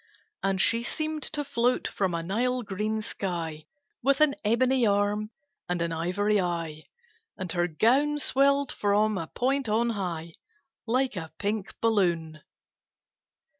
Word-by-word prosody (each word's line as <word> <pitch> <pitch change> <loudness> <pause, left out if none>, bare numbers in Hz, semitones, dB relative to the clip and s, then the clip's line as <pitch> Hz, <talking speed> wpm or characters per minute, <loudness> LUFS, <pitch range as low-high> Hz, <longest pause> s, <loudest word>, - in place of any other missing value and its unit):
And 195 -1 0
she 230 +4 +3
seemed 310 +5 -3
to 295 -1 -3
float 245 -2 +1
from 190 -4 -1
a 165 - -2
Nile 245 +7 0
green 215 +2 -2
sky, 165 -7 -4 0.3
With 275 +2 +3
an 305 -2 +5
ebony 250 +4 +3
arm 205 +1 +1 0.4
and 180 0 0
an 170 0 -1
ivory 195 +5 +1
eye, 165 -3 -3 0.5
And 185 -2 -4
her 175 0 +1
gown 260 - +3
swelled 280 0 +3
from 210 +1 +2
a 165 - -4
point 265 - 0
on 230 +2 +2
high, 170 -6 -4 0.5
Like 255 +1 +1
a 160 -3 -5
pink 205 -1 -2
balloon. 170 -8 +1
210 Hz, 135 wpm, -27 LUFS, 175-250 Hz, 0.5 s, an